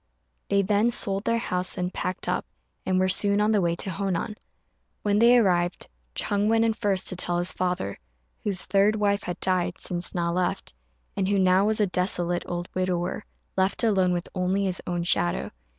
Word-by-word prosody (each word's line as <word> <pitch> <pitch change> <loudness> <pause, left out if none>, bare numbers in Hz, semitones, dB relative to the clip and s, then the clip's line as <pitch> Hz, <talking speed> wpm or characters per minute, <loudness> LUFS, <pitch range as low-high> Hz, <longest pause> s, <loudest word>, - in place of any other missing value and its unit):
They 200 0 +3
then 210 +3 +2
sold 200 -3 0
their 230 0 +2
house 185 -5 -2
and 180 0 -2
packed 185 - -3
up, - - -1 0.4
and 185 0 +2
were 185 - +3
soon 200 +2 +3
on 210 +1 +3
the 210 -2 +3
way 170 -1 +1
to 190 - -4
Honan. 195 +3 -2 0.7
When 205 0 +2
they 240 +2 +6
arrived, 175 -5 +1 0.3
Ch'êng 205 0 0
went 225 +1 +3
in 225 - +2
first 200 -4 0
to 185 - -5
tell 175 0 -1
his 175 +1 +1
father, 180 - -2 0.4
whose 195 -3 +1
third 200 +3 +3
wife 205 -1 +1
had 175 - -5
died 180 -1 0
since 175 0 -1
Na 170 -1 0
left, 180 - -2 0.4
and 190 - 0
who 200 0 +2
now 185 +1 +4
was 220 0 0
a 210 - +4
desolate 175 -2 0
old 175 0 -4
widower, 185 +2 -1 0.3
left 190 +3 +1
alone 190 -5 +3
with 175 -1 -2
only 185 +1 0
his 185 -1 -2
own 175 -1 -1
shadow. 85 - 0
185 Hz, 190 wpm, -26 LUFS, 180-205 Hz, 0.7 s, they